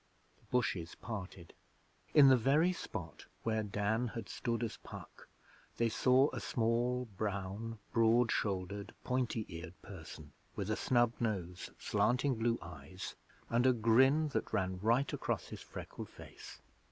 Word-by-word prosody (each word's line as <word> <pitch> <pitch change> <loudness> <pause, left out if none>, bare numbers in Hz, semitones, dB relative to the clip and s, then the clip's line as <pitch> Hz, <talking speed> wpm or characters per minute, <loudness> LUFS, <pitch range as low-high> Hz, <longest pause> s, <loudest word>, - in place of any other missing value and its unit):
The - - -27
bushes 95 -9 -1
parted. 95 -6 -7 0.6
In 145 -3 +9
the 130 - +8
very 145 +9 +3
spot 85 - -7 0.2
where 110 -1 +1
Dan 105 +3 0
had 115 -3 -6
stood 115 -1 -2
as 115 - -3
Puck - - -11 0.5
they 115 -1 +2
saw 130 +5 +4
a - - -3
small, 120 +2 +1
brown, 100 +2 -3 0.2
broad 115 +1 +4
shouldered, 100 0 -2
pointy 125 -3 0
eared 85 +1 -8
person 80 -5 -10 0.2
with 100 +1 -2
a - - +2
snub 120 0 +3
nose, 95 -6 -2
slanting 130 +3 +2
blue 115 0 +1
eyes, 85 +2 -8 0.3
and 120 +2 +3
a 130 - +6
grin 130 +7 +4
that 135 - -2
ran 95 -1 0
right 120 +7 +2
across - - -2
his - - -7
freckled - - -8
face. - - -12
115 Hz, 140 wpm, -35 LUFS, 95-125 Hz, 0.6 s, In